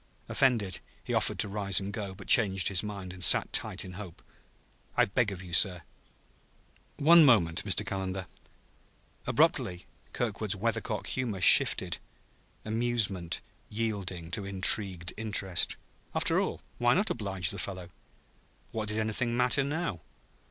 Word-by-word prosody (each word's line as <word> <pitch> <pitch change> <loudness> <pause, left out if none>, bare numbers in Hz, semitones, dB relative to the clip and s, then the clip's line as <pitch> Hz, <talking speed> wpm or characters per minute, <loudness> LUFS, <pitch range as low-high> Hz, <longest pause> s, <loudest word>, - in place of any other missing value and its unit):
Offended, 115 -9 0 0.2
he - - -5
offered - - 0
to - - 0
rise 100 -1 -1
and 100 +1 -6
go, 100 -3 -6
but 100 - -12
changed 95 -5 +5
his 95 -2 +1
mind 100 -3 -7
and 90 -1 -6
sat - - +5
tight - - 0
in 90 - -10
hope. 95 -3 -11 0.7
"I - - +4
beg 105 +1 -1
of 95 -1 -8
you, 90 -2 -11
sir 90 -1 +3 0.6
" - - -36 0.3
"One 165 +3 +6
moment, 90 - +3
Mr. 105 +1 0
Calendar." 95 -1 -4 1.0
Abruptly 90 +1 0 0.3
Kirkwood's - - -3
weathercock - - -3
humor 120 -7 -3
shifted - - +6 0.7
amusement 110 -6 -2 0.3
yielding 100 -6 -4
to 100 - -3
intrigued 95 -2 +2
interest. 100 -5 +1 0.4
After - - +2
all, - - -5 0.2
why 120 +1 +3
not 200 -1 0
oblige 95 - -2
the 100 - -7
fellow? 90 -2 -7 0.8
What 110 -1 -4
did 105 +1 -2
anything 110 +2 -1
matter, 125 +2 +2
now? 140 - -4
100 Hz, 140 wpm, -28 LUFS, 95-115 Hz, 1.0 s, One